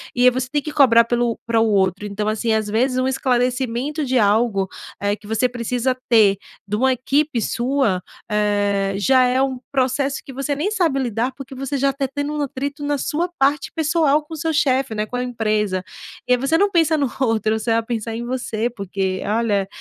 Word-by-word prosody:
e 250 +1 +6
você 255 0 -2
tem 290 0 0
que 300 - -6
cobrar 240 -6 +6
pelo 240 0 0
pra 230 -1 +1
o 225 - +3
outro. 195 -1 +1
Então, 210 +1 -3
assim, 220 +1 0
às 220 -1 0
vezes 255 +4 +1
um 255 - +1
esclarecimento 255 +3 0
de 260 0 +1
algo, 205 -2 +2 0.3
eh, 205 0 +1
que 210 0 -16
você 225 +3 +1
precisa 245 +1 -1
ter 210 -4 +5 0.3
de 205 - -1
uma 260 +4 +3
equipe 270 +1 0
sua, 240 -5 0 0.3
eh, 205 -2 +1
já 255 +5 +4
é 250 +1 +2
um 265 -2 -1
processo 270 +1 0
que - - -9
você 275 +2 -2
nem 340 +9 -1
sabe 330 -10 +1
lidar, 240 0 -1
porque 275 -2 -9
você 270 +2 -4
já 275 +1 +2
tá 275 0 -2
tendo 285 +1 -2
um 300 - -2
atrito 280 +1 -4
na 290 0 0
sua 330 +6 -1
parte 275 +1 +1
pessoal 310 -2 +2
com 320 +1 -9
seu 320 +1 -2
chefe, 270 -6 +1
né, 210 - -1
com 245 - -5
a 250 - -1
empresa. 215 -6 -1 0.4
E - - -1
aí - - +4
você 275 +6 +1
não 400 +3 +2
pensa 325 -2 +3
no 275 -5 0
outro, 220 -2 +1
você 225 +1 -2
vai 225 0 +2
pensar 225 -1 -4
em 235 - -4
você, 240 -2 -2
porque, 195 -4 -3
olha, 210 -2 0
250 Hz, 205 wpm, -21 LUFS, 220-275 Hz, 0.4 s, e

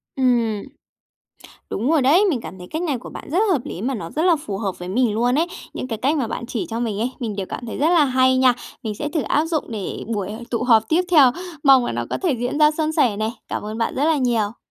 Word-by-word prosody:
Ừm. 235 -5 +1 1.1
Đúng 240 +8 -1
rồi 320 -4 +3
đấy, 320 +11 +5
mình 265 -8 -1
cảm 175 +2 -9
thấy 180 - -9
cách 315 - -3
này 290 -8 -1
của - - -10
bạn - - -9
rất 335 - +1
hợp 290 - +1
lý 180 - -6
mà 265 +3 -1
nó 170 -8 -6
rất 310 - -2
là 350 -3 +4
phù 205 -9 -5
hợp 195 -4 -3
với 180 - -7
mình 225 +2 +1
luôn 245 +3 +2
ấy. 325 +4 +2 0.3
Những - - -4
cái 225 -3 -3
cách 285 +5 +1
mà 265 -5 0
bạn 235 +1 -5
chỉ 230 - -3
cho 225 +1 -3
mình 220 -4 -2
ấy, 240 +3 0
mình 220 -4 -3
đều 190 -2 -3
cảm 245 - -6
thấy 225 - -5
rất 300 - +3
là 340 -4 +5
hay 260 -1 +3
nha. 255 -1 +5 0.3
Mình 220 -3 -3
sẽ 295 +8 -3
thử 305 -2 -1
áp 295 +7 +1
dụng 320 -3 -1
để 210 -4 -5
buổi 205 -3 -3
h 220 - -6
tụ 235 -1 -1
họp 225 -3 +4
tiếp 335 +3 +3
theo. 280 -7 +7 0.3
Mong 270 -3 +7
là - - -2
nó - - -2
có - - -1
thể 350 - +2
diễn 245 +5 -2
ra 300 0 +6
suôn 310 0 -1
sẻ 260 -10 +2
này. 215 +2 -1 0.2
Cảm - - -3
ơn 215 +1 -5
bạn 230 - -1
rất 280 - +1
là 320 0 +3
nhiều. 235 -5 0
245 Hz, 280 wpm, -21 LUFS, 220-295 Hz, 1.1 s, theo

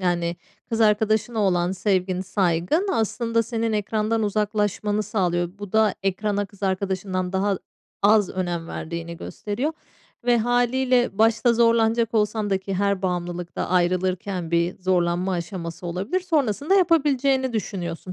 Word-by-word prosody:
Yani, 175 -2 0 0.3
kız 225 0 -2
arkadaşına 220 +1 +2
olan 180 -2 +2
sevgin, 185 -1 0
saygın 190 - 0
aslında 230 +1 0
senin 230 -1 -2
ekrandan 215 +1 0
uzaklaşmanı 210 0 0
sağlıyor. 180 -5 0
Bu 205 -1 -8
da 220 -1 +3
ekrana 200 +1 -1
kız 200 0 -21
arkadaşından 190 -1 -1
daha 195 0 +1 0.4
az 205 -1 +4
önem 175 -3 -3
verdiğini 170 +1 -5
gösteriyor 240 - -3 0.5
ve 240 -1 +4
hâliyle 245 -1 +1
başta 225 +2 +4
zorlanacak 230 0 +3
olsan 210 -1 +1
da 195 - +2
ki 190 0 -5
her 200 0 0
bağımlılıkta 175 -1 -3
ayrılırken 180 0 0
bir 170 +1 +1
zorlanma 180 0 +1
aşaması 170 -1 -5
olabilir. 190 - -2
Sonrasında 300 - +1
yapabileceğini 275 -7 +3
düşünüyorsun. 185 -5 -4
205 Hz, 125 wpm, -23 LUFS, 180-225 Hz, 0.5 s, az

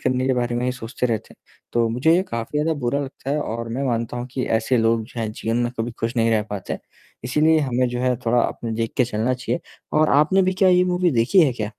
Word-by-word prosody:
करने 130 0 0
के 130 - +2
बारे 120 -1 -1
में 125 - -1
ही 125 - +1
सोचते 125 0 -3
रहते 115 -3 -3
हैं। - - -31
तो 115 -1 +2
मुझे 135 +9 +3
ये 180 - +3
काफ़ी 115 +5 -3
ज़्यादा 160 +2 +1
बुरा 125 +3 0
लगता 135 -1 -6
है 150 +1 0
और 115 -3 -4
मैं 135 +4 -2
मानता 115 -1 -1
हूँ 120 0 -4
कि 130 - -2
ऐसे 120 +3 +1
लोग 115 0 +2
जो 120 0 -7
हैं 110 - -2
जीवन 115 +1 -2
में 120 0 0
कभी 115 +2 -1
खुश 115 +2 -2
नहीं 115 0 +3
रह 110 -2 +2
पाते 100 -2 -4
हैं। - - -4 0.4
इसीलिए 155 +6 +3
हमें 130 -2 +1
जो 120 0 -3
है 125 0 +1
थोड़ा 120 +1 +4
अपने 115 -1 -3
देख 115 -1 -2
के 125 - +4
चलना 115 +2 -1
चाहिए 125 +6 -3 0.4
और 155 - +4
आपने 155 +7 +4
भी 185 - +1
क्या 190 - +7
ये 180 0 +5
मूवी 180 -1 +1
देखी 125 +10 +4
है 130 - 0
क्या? 110 -3 -4
125 Hz, 265 wpm, -22 LUFS, 115-140 Hz, 0.4 s, क्या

